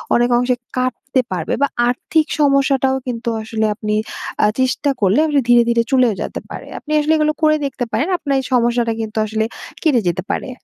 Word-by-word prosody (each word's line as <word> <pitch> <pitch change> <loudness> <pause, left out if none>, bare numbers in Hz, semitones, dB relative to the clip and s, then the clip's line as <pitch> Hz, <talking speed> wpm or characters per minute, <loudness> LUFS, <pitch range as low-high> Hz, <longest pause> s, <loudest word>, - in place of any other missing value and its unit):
অনেক 240 +1 +3
অংশে 250 0 +1 0.2
কাটতে 255 +1 0
পারবে, 175 -4 -2
বা 280 - +4 0.2
আর্থিক 305 +5 +1
সমস্যাটাও 275 -2 +3
কিন্তু 235 -1 -3
আসলে 220 0 -2
আপনি 210 -1 -2 0.5
আ - - +5
চেষ্টা 260 +3 +1
করলে 200 +7 +3 0.3
ধীরে, 240 0 +6
ধীরে 235 0 +3
চলেও 255 -4 +4
যেতে - - -4
পারে। - - -8
আপনি 305 - -10
আসলে 305 +2 +2
এগুলো 305 0 +2
করে 310 0 +5
দেখতে 265 -2 -3
পারেন। 285 +9 0
আপনার 280 -4 -1
এই 265 - -5
সমস্যাটা 235 -1 +2
কিন্তু 220 0 -6
আসলে 220 +1 -1 0.4
কেটে 290 -8 +3
যেতে 175 +1 -1
পারে। - - -3
250 Hz, 180 wpm, -18 LUFS, 230-275 Hz, 0.5 s, ধীরে